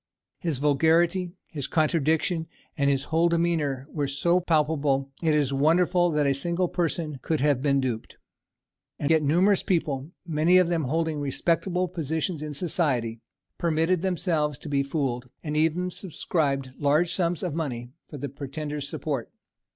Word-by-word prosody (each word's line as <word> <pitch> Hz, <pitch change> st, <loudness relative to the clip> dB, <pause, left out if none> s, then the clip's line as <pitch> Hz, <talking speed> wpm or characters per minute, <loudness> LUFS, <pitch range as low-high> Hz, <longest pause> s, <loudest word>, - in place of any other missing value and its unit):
His 165 Hz, -6 st, -2 dB
vulgarity, 165 Hz, +5 st, +2 dB
his 145 Hz, -4 st, -5 dB
contradictions, 160 Hz, +1 st, +1 dB, 0.3 s
and 140 Hz, -1 st, +2 dB
his 135 Hz, -1 st, +1 dB
whole 165 Hz, +1 st, +4 dB
demeanour 160 Hz, -6 st, 0 dB
were 145 Hz, -3 st, -1 dB
so 170 Hz, +6 st, +2 dB
palpable, 150 Hz, -5 st, +1 dB
it 160 Hz, -2 st, +2 dB
is 140 Hz, -2 st, +1 dB
wonderful 175 Hz, +5 st, +3 dB
that 150 Hz, -2 st, +1 dB
a 140 Hz, -, +3 dB
single 170 Hz, +6 st, 0 dB
person 165 Hz, -5 st, -2 dB
could 160 Hz, +3 st, -1 dB
have 140 Hz, -2 st, +2 dB
been 140 Hz, -1 st, +2 dB
duped. 125 Hz, -4 st, -3 dB, 0.8 s
And 145 Hz, -, 0 dB
yet 160 Hz, -1 st, +5 dB
numerous 175 Hz, +7 st, +3 dB
people, 150 Hz, -6 st, -1 dB, 0.2 s
many 165 Hz, +2 st, +3 dB
of 180 Hz, -2 st, +4 dB
them 165 Hz, -4 st, 0 dB
holding 160 Hz, +2 st, -1 dB
respectable 170 Hz, +6 st, 0 dB
positions 160 Hz, 0 st, -2 dB
in 150 Hz, -1 st, -5 dB
society, 135 Hz, -9 st, 0 dB, 0.4 s
permitted 165 Hz, +1 st, +1 dB
themselves 165 Hz, -6 st, 0 dB
to 155 Hz, -, -9 dB
be 140 Hz, -1 st, +2 dB
fooled, 135 Hz, -4 st, -2 dB
and 150 Hz, -1 st, -3 dB
even 165 Hz, +4 st, +1 dB
subscribed 145 Hz, -7 st, -2 dB
large 150 Hz, +4 st, +2 dB
sums 175 Hz, -3 st, 0 dB
of 175 Hz, -5 st, -2 dB
money 125 Hz, -7 st, -4 dB, 0.2 s
for 150 Hz, -, -8 dB
the 140 Hz, +1 st, -4 dB
pretender's 145 Hz, +1 st, -5 dB
support. 140 Hz, -7 st, -3 dB
155 Hz, 150 wpm, -26 LUFS, 140-170 Hz, 0.8 s, yet